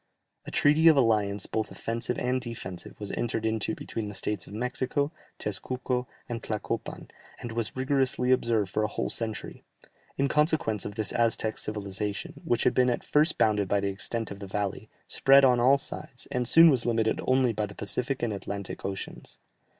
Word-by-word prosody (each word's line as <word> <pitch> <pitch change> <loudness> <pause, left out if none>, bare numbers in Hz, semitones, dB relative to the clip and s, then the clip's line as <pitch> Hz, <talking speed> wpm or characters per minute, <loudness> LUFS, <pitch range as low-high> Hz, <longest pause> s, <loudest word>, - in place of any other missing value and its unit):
A - - -3
treaty 150 +3 +4
of 160 -3 +7
alliance 105 -5 +2
both 110 -1 -2
offensive 115 +2 -3
and 125 +1 0
defensive 100 -7 -7
was 105 -1 -3
entered 115 -1 -2
into 110 -2 0
between 110 -2 -5
the 105 - -7
states 105 -4 -2
of - - -11
Mexico, 130 +5 -1 0.3
Tezcuco, 125 +4 -2 0.2
and 120 -1 -4
Tlacopan, 110 -2 -4 0.3
and 120 - -6
was 110 -3 -2
rigorously 130 -1 +1
observed 115 -6 +2
for 110 - 0
a 105 - +1
whole - - -3
century; 110 -2 -2 0.6
in 140 - +2
consequence 150 - +1
of 100 - -6
this 110 -1 +1
the - - 0
Aztec 110 -1 +1
civilization, 105 -1 -4
which 120 - +1
had - - +3
been 125 0 +3
at 120 - -1
first 150 +3 +3
bounded 105 -2 +2
by 100 +2 +2
the 100 0 -1
extent 110 +3 -4
of 100 - -7
the 100 - -7
valley, 100 +1 -3 0.2
spread 135 0 +5
on 125 -2 +4
all 130 +3 +5
sides, - - -4
and 125 -1 -1
soon 165 +4 +8
was 125 -4 +3
limited 115 -2 +1
only 130 -2 +3
by 105 0 -2
the 100 - -12
Pacific 125 +6 -1
and 115 -3 0
Atlantic 100 0 -6
Oceans. 95 0 -6
115 Hz, 185 wpm, -28 LUFS, 105-130 Hz, 0.6 s, soon